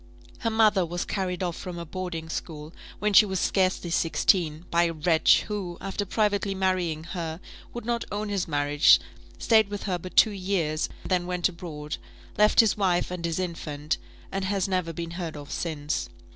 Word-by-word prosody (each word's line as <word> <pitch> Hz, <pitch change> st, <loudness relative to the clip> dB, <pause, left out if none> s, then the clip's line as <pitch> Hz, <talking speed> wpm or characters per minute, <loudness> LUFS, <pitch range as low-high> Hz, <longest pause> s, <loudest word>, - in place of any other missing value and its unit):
Her 230 Hz, -, 0 dB
mother 215 Hz, -4 st, +4 dB
was 175 Hz, +1 st, -3 dB
carried 185 Hz, -2 st, -2 dB
off 175 Hz, -2 st, -2 dB
from 180 Hz, -1 st, -7 dB
a 170 Hz, -, -5 dB
boarding 175 Hz, -2 st, -5 dB
school, 155 Hz, -1 st, -6 dB, 0.2 s
when 210 Hz, 0 st, 0 dB
she 205 Hz, -, +9 dB
was 190 Hz, -3 st, -2 dB
scarcely 185 Hz, -2 st, +1 dB
sixteen, 165 Hz, -1 st, +1 dB
by 170 Hz, +1 st, +4 dB
a 165 Hz, -, -1 dB
wretch, 160 Hz, +1 st, +4 dB
who, 195 Hz, -5 st, -4 dB
after 195 Hz, +1 st, -3 dB
privately 205 Hz, -2 st, +1 dB
marrying 185 Hz, -4 st, 0 dB
her, 165 Hz, -1 st, -5 dB, 0.3 s
would 240 Hz, -2 st, -7 dB
not 235 Hz, 0 st, -1 dB
own 210 Hz, +1 st, -2 dB
his 200 Hz, -3 st, -1 dB
marriage, 145 Hz, -1 st, +5 dB, 0.4 s
stayed 220 Hz, -3 st, +4 dB
with 205 Hz, 0 st, -5 dB
her 185 Hz, -3 st, -1 dB
but 185 Hz, +2 st, -10 dB
two 220 Hz, -, +7 dB
years, 180 Hz, -6 st, -1 dB, 0.2 s
then 180 Hz, -2 st, 0 dB
went 180 Hz, 0 st, +1 dB
abroad, 155 Hz, -4 st, -6 dB, 0.4 s
left 210 Hz, +2 st, +6 dB
his 220 Hz, -3 st, +2 dB
wife 180 Hz, -4 st, +1 dB
and 180 Hz, -2 st, -4 dB
his 165 Hz, -1 st, -1 dB
infant, 165 Hz, -4 st, -3 dB, 0.3 s
and 195 Hz, 0 st, -2 dB
has 195 Hz, 0 st, 0 dB
never 185 Hz, -3 st, -1 dB
been 165 Hz, +1 st, -5 dB
heard 170 Hz, -3 st, -5 dB
of 145 Hz, -1 st, -9 dB
since. 150 Hz, -3 st, -2 dB
180 Hz, 180 wpm, -26 LUFS, 165-195 Hz, 0.4 s, she